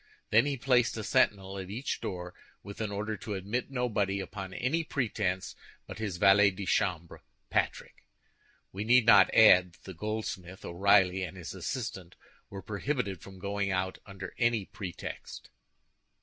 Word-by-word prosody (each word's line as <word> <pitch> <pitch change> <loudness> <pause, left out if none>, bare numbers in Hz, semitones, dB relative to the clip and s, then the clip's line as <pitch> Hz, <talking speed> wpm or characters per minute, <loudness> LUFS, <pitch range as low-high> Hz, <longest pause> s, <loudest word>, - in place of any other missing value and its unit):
Then 115 +6 +5
he 140 -1 -1
placed 125 -2 +2
a 110 - -4
sentinel 95 -1 +1
at 95 -1 -7
each 120 +7 -3
door, 90 -1 -5 0.3
with 100 +2 -8
an 105 -2 -2
order 105 +2 -3
to 105 - -5
admit 105 +8 -3
nobody 105 -7 -1
upon 95 -1 -6
any 145 - -1
pretense 105 - -2 0.3
but - - -9
his 105 -5 -3
valet 100 +3 +6
de 100 +1 -6
chambre, 85 -3 -1 0.3
Patrick. - - -2 0.7
We 100 +2 -4
need 120 +1 +5
not 110 -3 +7
add 90 -5 +6
that - - -23
the 95 - -8
goldsmith, 95 -1 -5
O'Reilly, 95 +1 +3
and 95 0 -5
his 85 - -7
assistant, 95 -2 -5 0.3
were 100 -1 -8
prohibited 105 - -3
from 95 -1 -12
going 100 +1 -2
out 95 0 -2
under 95 -2 -8
any 115 -4 +2
pretext. 95 -4 -8
100 Hz, 155 wpm, -30 LUFS, 95-110 Hz, 0.7 s, not